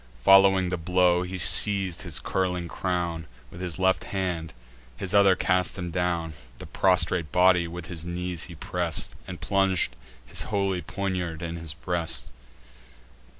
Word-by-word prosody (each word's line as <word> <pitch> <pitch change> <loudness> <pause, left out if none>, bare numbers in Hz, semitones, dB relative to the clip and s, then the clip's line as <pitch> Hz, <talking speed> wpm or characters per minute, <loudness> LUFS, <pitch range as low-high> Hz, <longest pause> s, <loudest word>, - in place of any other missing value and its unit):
Following 95 0 +5
the 90 -1 -3
blow, 90 +1 +2
he 90 +1 -5
seiz'd 95 0 +5
his 85 -7 +1
curling 90 -2 -2
crown 85 -3 -3 0.2
With 85 - -10
his 90 -4 -3
left 95 0 +1
hand; 90 -4 -3 0.5
his 90 +6 -3
other 100 -2 +5
cast 90 +1 +1
him 90 -2 -5
down. 85 -2 -2 0.2
The - - -10
prostrate 85 -4 +1
body 90 -1 +3
with 85 0 -8
his 80 -2 -6
knees 85 0 -4
he 85 - -10
press'd, 85 0 -2
And 90 -2 -8
plung'd 95 -2 +1 0.5
his - - -2
holy 100 -3 -1
poniard 90 -3 -4
in 85 0 -5
his 80 -2 -8
breast. 85 -1 -1
90 Hz, 150 wpm, -25 LUFS, 85-95 Hz, 0.5 s, Following